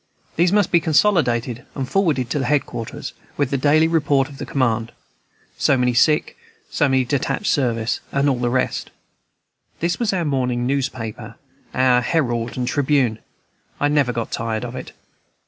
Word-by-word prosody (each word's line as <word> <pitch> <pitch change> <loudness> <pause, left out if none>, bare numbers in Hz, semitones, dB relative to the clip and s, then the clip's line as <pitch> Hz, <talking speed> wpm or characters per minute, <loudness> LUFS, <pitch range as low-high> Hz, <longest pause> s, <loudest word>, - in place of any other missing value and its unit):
These 175 +2 +3
must 205 -2 +2
be 170 - +5
consolidated 135 - +1
and 135 -2 -3
forwarded 145 -9 0
to 145 - 0
head 145 +2 +1
quarters, 115 - -6 0.2
with 140 -3 0
the - - +1
daily 155 +3 +4
report 145 -5 +2
of 140 - -12
the - - -5
command, 115 -4 0 0.7
so 140 - +3
many 125 -1 +1
sick, 150 +6 +2 0.4
so 145 -3 +2
many 130 -1 +3
on - - -10
detached 140 +9 -1
service, 120 - 0
and 140 +1 +1
all 130 -3 +1
the 120 0 0
rest. 130 +1 -1 0.9
This 170 +1 -1
was 235 -3 +1
our 180 -4 -1
morning 125 -4 0
newspaper, 130 -5 -3 0.4
our 130 -1 +4
Herald 120 -5 -1
and 125 -1 -1
Tribune; 130 -5 +1 0.6
I 145 - +2
never 145 -4 +2
got 115 -1 -4
tired 115 +1 -2
of 120 +1 -7
it. 130 - -8
130 Hz, 165 wpm, -21 LUFS, 120-150 Hz, 0.9 s, be